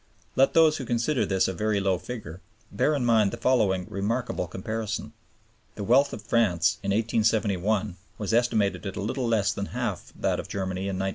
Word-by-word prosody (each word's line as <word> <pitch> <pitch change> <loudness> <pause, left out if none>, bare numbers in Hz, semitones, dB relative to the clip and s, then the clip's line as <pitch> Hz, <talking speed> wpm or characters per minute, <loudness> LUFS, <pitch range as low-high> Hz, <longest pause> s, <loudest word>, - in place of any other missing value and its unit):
Let 135 +1 +3
those 160 -2 +5
who 130 - -5
consider 120 +4 0
this 95 -1 +2
a 95 - -2
very 105 +3 0
low 95 -2 +1
figure, 95 -7 -8 0.3
bear 150 +9 +1
in 130 -4 -1
mind 110 -4 +4
the - - -6
following 100 -8 +2
remarkable 105 0 -2
comparison. 110 +3 -4 0.6
The 105 - -5
wealth 135 +7 +4
of 110 - -7
France 90 -7 +2
in 100 - -3
1871 105 -2 +1 0.2
was 105 +1 -3
estimated 110 -4 +1
at 95 - -5
a - - -4
little 125 +3 -2
less 105 -3 +2
than 100 0 -4
half - - -3
that - - 0
of - - -6
Germany 95 0 -3
in 95 -1 -2
1913. 95 +1 -1
105 Hz, 190 wpm, -26 LUFS, 95-115 Hz, 0.6 s, those